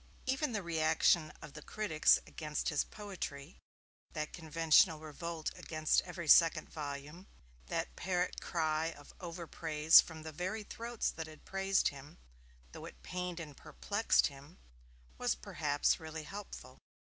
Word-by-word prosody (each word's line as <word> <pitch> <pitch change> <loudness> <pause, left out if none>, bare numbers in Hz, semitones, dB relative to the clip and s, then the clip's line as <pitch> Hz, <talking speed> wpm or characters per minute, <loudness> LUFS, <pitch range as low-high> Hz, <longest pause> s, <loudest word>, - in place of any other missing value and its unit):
Even 270 +1 0
the 205 -4 -2
reaction 160 -1 +3
of 150 -2 -10
the 150 - -9
critics 160 -4 +3
against 150 -2 -3
his 150 - +1
poetry, 175 -7 -7 0.5
that 155 -1 -4
conventional 160 0 +4
revolt 160 +1 -5
against 155 -1 +1
every 175 -2 -7
second 165 0 +6
volume, 150 +4 -6 0.4
that - - -3
parrot 180 -1 -1
cry 160 -1 0
of 145 0 -15
over 170 -1 -6
praise 160 -1 +6
from 160 -2 -10
the 160 - -6
very 185 +8 -3
throats 230 +2 -3
that 160 -1 -6
had 155 -1 -14
praised 195 0 +2
him, 140 +4 -12 0.5
though - - -9
it - - -12
pained 180 -1 -4
and 150 -4 -8
perplexed 210 +2 +1
him, 145 +4 -7 0.6
was - - +1
perhaps 145 - 0
really 160 -1 -6
helpful. 205 +6 -9
160 Hz, 140 wpm, -34 LUFS, 155-180 Hz, 0.6 s, second